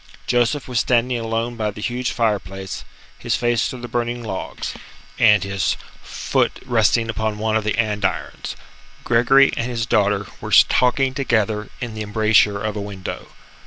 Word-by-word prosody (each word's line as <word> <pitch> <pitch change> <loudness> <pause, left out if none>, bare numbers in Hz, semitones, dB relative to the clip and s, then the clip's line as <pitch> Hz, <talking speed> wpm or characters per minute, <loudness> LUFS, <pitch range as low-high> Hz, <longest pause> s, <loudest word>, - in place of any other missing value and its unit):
Joseph 125 +3 +1
was 125 -2 0
standing 125 0 +1
alone 115 +1 -2
by 110 -2 -1
the 105 - -8
huge 120 +3 -2
fire 110 -4 +1
place, 95 +1 -7 0.4
his - - 0
face 120 -1 +1
to 130 - -6
the 120 0 -7
burning 120 0 -2
logs, 95 -4 -5 0.5
and 105 -4 +5
his 100 -2 -1 0.2
foot - - -1
resting 115 -1 +2
upon 110 -1 -2
one 110 +1 0
of 110 - +1
the 105 +1 -1
andirons. 105 -3 -2 0.5
Gregory 130 +4 +5
and 115 - -2
his 115 -2 -2
daughter 105 -3 +2 0.2
were - - -5
talking 130 +1 +2
together 110 -5 0
in 120 -3 -5
the 110 - -6
embrasure 105 -1 +3
of 110 0 -3
a 105 - -3
window. 100 -2 -6
115 Hz, 160 wpm, -21 LUFS, 105-120 Hz, 0.5 s, and